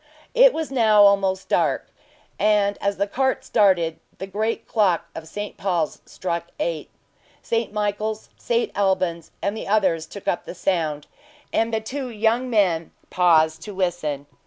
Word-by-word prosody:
It - - +7
was 320 - -4
now 220 -5 +5
almost 195 -1 +3
dark, - - 0 0.5
and 205 -1 +3
as 200 0 0
the 200 - +1
cart 265 +5 -1
started, 180 -6 +2 0.2
the 190 - -5
great 215 +4 -2
clock 185 -7 +2
of 160 0 -8
St. 205 +5 -6
Paul's 175 -6 -1
struck 170 -2 -3
eight. 165 -3 -2 0.5
St. 230 -1 -1
Michael's, 210 +1 -2
St 235 0 -1
Alban's, 185 -4 0
and 200 +1 0
the - - -6
others 185 -6 +1
took 200 - -11
up - - 0
the - - -8
sound; 160 -6 -1 0.5
and 225 +1 +1
the 220 -1 0
two 255 +4 -5
young 230 +3 0
men 180 -8 +2 0.2
paused 160 -3 +3
to 205 - -8
listen. 170 -6 -2
200 Hz, 155 wpm, -23 LUFS, 170-220 Hz, 0.5 s, It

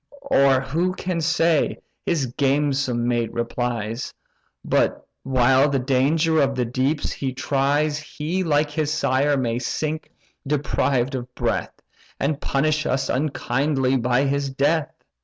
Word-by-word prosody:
"Or 135 -1 +5
who 165 +7 -1
can 180 -3 -2
say 165 -1 +2 0.3
(his 155 -6 +1
gamesome 135 -4 +1
mate 120 -2 0
replies) 120 -1 -3 0.5
But, - - +1
while 130 +2 +3
the 140 - +1
danger 150 +5 +2
of 135 -1 +1
the 125 -1 0
deeps 130 +6 -1
he 135 -2 -3
tries 145 +3 0
He, 155 +4 -3
like 150 -2 +1
his 150 0 -1
sire, 140 -1 +1
may 120 -2 -1
sink 155 +4 -3 0.4
deprived 135 -2 0
of 125 -1 -6
breath, - - -2 0.4
And 145 +1 -1
punish 155 +2 0
us 135 - 0
unkindly 135 -1 0
by 125 +2 +2
his 140 0 0
death? 145 +4 +1
140 Hz, 130 wpm, -23 LUFS, 130-150 Hz, 0.5 s, Or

